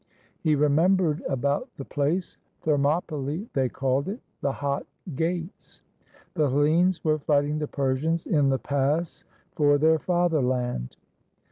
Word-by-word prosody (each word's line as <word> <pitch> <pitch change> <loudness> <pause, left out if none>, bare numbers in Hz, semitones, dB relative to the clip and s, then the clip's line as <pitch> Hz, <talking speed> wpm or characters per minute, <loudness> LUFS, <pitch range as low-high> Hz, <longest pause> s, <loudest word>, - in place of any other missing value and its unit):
He 155 -1 +2
re 150 +1 +3
membered 165 +1 +2
about 140 - -1
the 135 - -6
place: 155 +6 -1 0.3
Thermopylae, 150 - 0
they 130 -2 +1
called 135 +2 -1
it, 215 +5 -5 0.2
the 140 - +1
Hot 140 0 -3 0.3
Gates. 170 +3 -4 0.5
The 155 -6 +1
Hellenes 160 +7 +2
were 155 -1 +2
fighting 145 +1 +1
the 150 - -2
Persians 145 +5 -1
in 145 -4 +2
the 135 - +2
pass 145 +5 -1 0.3
for 145 -1 +3
their 160 +2 +3
fatherland. 130 - 0
150 Hz, 130 wpm, -26 LUFS, 140-165 Hz, 0.5 s, re